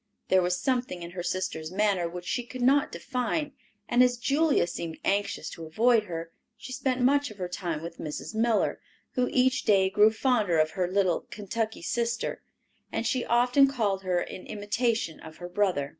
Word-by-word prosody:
There 190 0 +5
was 180 0 0
something 245 -9 -1
in 170 - -7
her 180 0 -5
sister's 175 -3 -3
manner 195 -3 +1
which 175 +1 -7
she 245 - -1
could 245 +1 -6
not 275 +3 +4
define, 275 +4 -2 0.4
and 240 +1 +3
as 250 -1 +4
Julia 285 - +2
seemed 170 -2 -5
anxious 200 +1 0
to 165 - -8
avoid 225 +6 +3
her, 165 -2 -6 0.3
she 255 - -9
spent 255 -1 -1
much 285 +3 +3
of 215 - -12
her 180 -2 -3
time 175 -3 -4
with 170 0 -8
Mrs. 150 +7 -5
Miller, 225 0 +1 0.3
who 250 -1 0
each 260 0 +3
day 195 -3 +3
grew 210 +2 +6
fonder 220 -7 +1
of 155 0 +3
her 185 -2 -1
little 190 -3 +1
"Kentucky 215 -1 -4
sister," 235 +5 -2 0.5
as 230 - -2
she 245 +1 0
often 250 +3 +4
called 215 -8 0
her 180 -2 0
in 185 - -7
imitation 215 -3 -1
of 160 0 -11
her 175 - -7
brother. 175 -7 0
210 Hz, 185 wpm, -28 LUFS, 180-245 Hz, 0.5 s, grew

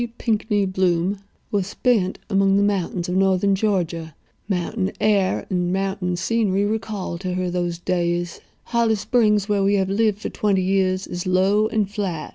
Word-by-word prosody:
Pinkney 215 -3 0
Bloom, 185 0 0 0.3
"were 205 - +1
spent 200 0 0
among 195 -1 +3
the 200 - +3
mountains 185 -3 -1
of 180 - -2
northern 195 +1 +3
Georgia. 175 -6 -1 0.3
Mountain 190 +1 -1
air 200 -3 +2
and 180 -1 0
mountain 190 -1 -1
scenery 200 0 +1
recall 210 -5 -3
to 185 -1 -3
her 180 -1 -1
those 175 -1 -2
days. 175 0 -2 0.2
Holly 235 -2 +1
Springs, 210 -2 +2
where 205 -2 +1
we 200 +1 +3
have 190 -1 +1
lived 210 0 +1
for 210 - -5
twenty 195 -3 0
years, 190 0 +1
is 175 +1 -5
low 195 +4 +3
and 215 -2 0
flat. 195 -6 -4
195 Hz, 160 wpm, -22 LUFS, 180-205 Hz, 0.3 s, among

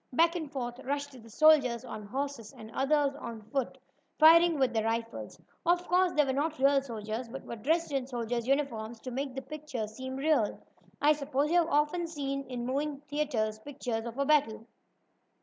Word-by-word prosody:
Back 335 +6 +3
and 315 -5 -4
forth 245 -2 -4
rushed 285 +2 -3
the 235 -4 -14
soldiers 260 -3 +4
on 210 -4 -7
horses, 265 -2 -4
and 220 0 -10
others 280 +2 +2
on 225 -5 -7
foot, 270 -3 -1 0.4
firing 330 +1 +7
with 260 -3 +2
their 220 -1 0
rifles. 230 0 -3 0.2
Of 350 0 +2
course 360 0 +3
they 300 -1 +4
were 265 - 0
not 305 +3 -1
real 275 +1 +4
soldiers, 230 -1 -5
but 270 +3 -8
were - - -6
dressed 315 +8 0
in 270 -2 -1
soldiers' 240 -2 -3
uniforms 235 -5 -1
to 255 - -6
make 265 +1 -3
the 270 - -4
picture 300 -7 -5
seem 260 +5 -7
real. 275 -6 +1 0.4
I 295 +2 +5
suppose 290 0 -1
you 350 - +5
have 335 -1 +1
often 300 +4 +1
seen 275 -3 -3
in 245 -2 -4
moving 280 +2 -2
picture 290 - -34 0.4
theatres 215 0 -6
pictures 245 -3 -4
of 235 +2 -7
a 280 - +1
battle. 275 -7 +2
275 Hz, 190 wpm, -30 LUFS, 235-300 Hz, 0.4 s, firing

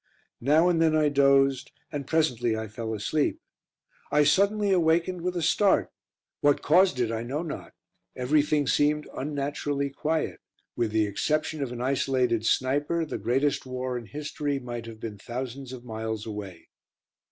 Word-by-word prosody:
Now 150 +7 +4
and 170 -2 +2
then 160 -1 +4
I 155 -1 +3
dozed, 140 -1 +3 0.2
and 140 -2 -4
presently 125 -8 +1
I 110 0 -4
fell 110 +1 -5
asleep. 145 +8 0 0.7
I 150 0 +5
suddenly 200 +7 +3
awakened 170 0 +2
with 180 +1 -2
a 170 - -1
start. 195 +5 +3 0.5
What 145 -1 +2
caused 175 -3 +4
it 120 -2 +1
I 115 0 -2
know 135 +7 -3
not; 160 - -7 0.4
everything 145 +3 +2
seemed 150 +2 +2
unnaturally 140 0 -2
quiet; 155 +3 -2 0.4
with 115 - 0
the 110 0 +2
exception 155 +9 -1
of 135 -3 -2
an 120 -1 -5
isolated 125 -3 +1
sniper, 145 +6 +1
the - - -5
greatest 135 +2 0
war 130 0 -3
in 120 -2 -5
history 145 +1 -3
might 120 -3 -6
have 110 -1 -9
been 110 -3 -6
thousands 125 +3 -6
of 125 -1 -9
miles 110 -2 -4
away. 105 -5 -8
140 Hz, 155 wpm, -27 LUFS, 120-155 Hz, 0.7 s, I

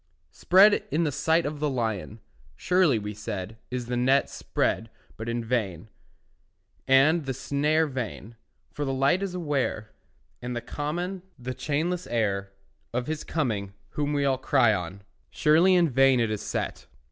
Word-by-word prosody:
Spread 195 +4 +5
in 165 -2 +1
the 150 - 0
sight 160 +4 +1
of 145 0 -4
the 150 0 0
lion, 110 -4 -3 0.3
Surely, 180 - +3
we 105 0 -5
said, 105 0 -6
is 125 -1 -3
the 125 +1 -3
net 130 +3 +2
Spread 115 - -1 0.3
but 110 +1 -6
in 120 0 -2
vain, 110 -6 -2 1.0
and 145 +4 +4
the 135 - -2
snare 150 +4 +1
Vain; 120 -5 -6 0.4
for 150 - -4
the 135 -1 -1
light 140 +8 +2
is 195 -2 -3
aware, 140 -10 -2 0.5
And 125 0 -4
the - - -1
common, 175 +8 -4 0.2
the 130 0 -5
chainless 165 +6 -2
air, 100 -4 -1 0.4
Of 125 +1 -2
his 155 +1 -4
coming 105 -10 -2
whom 145 0 -2
all 135 -1 +2
we 130 - -24
cry 130 -5 +4
on; 95 +1 -5 0.3
Surely 165 +5 +4
in 175 -2 +4
vain 135 -1 +4
is 115 -2 +1
it 105 - -3
set. - - -4
135 Hz, 160 wpm, -26 LUFS, 115-155 Hz, 1.0 s, Spread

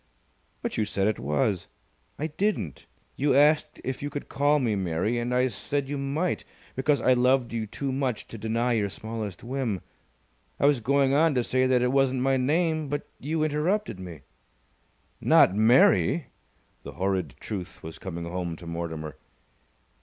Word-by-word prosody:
"But - - -3
you 110 - +1
said 100 -1 -1
it 110 0 0
was." 90 - 0 0.5
"I 150 - -2
didn't. 160 - -2 0.3
You 140 -1 +2
asked 150 +2 +3
if 130 0 -4
you 145 - -3
could 145 - -6
call 145 +2 +3
me 120 -7 +1
Mary, 95 +5 0
and 120 +1 -2
I 125 +1 +3
said 135 +7 -3
you 145 - -2
might, 150 +6 -1 0.3
because 135 0 +2
I 130 - +5
loved 125 -1 +2
you 110 -2 -2
too 135 +6 -3
much 130 -4 -2
to 115 - -8
deny 115 +3 0
your 105 -3 +1
smallest 110 -3 -6
whim. 120 -6 -2 0.8
I - - +2
was 145 -3 +4
going 135 +3 +2
on 155 0 +4
to 125 - +2
say 130 +2 +1
that 125 -1 +3
it 125 - +2
wasn't 135 -1 +2
my 135 0 +3
name, 155 +4 +1
but 145 +1 -3
you 155 +3 -1
interrupted 155 - 0
me." 85 -5 -8 1.0
"Not - - +6
Mary!" 115 - +4 0.5
The - - -9
horrid 95 0 -1
truth 95 -5 -6
was 80 0 -8
coming 85 -3 -5
home 85 -1 -3
to 85 - -12
Mortimer. 80 -3 -5
125 Hz, 170 wpm, -27 LUFS, 100-140 Hz, 1.0 s, Not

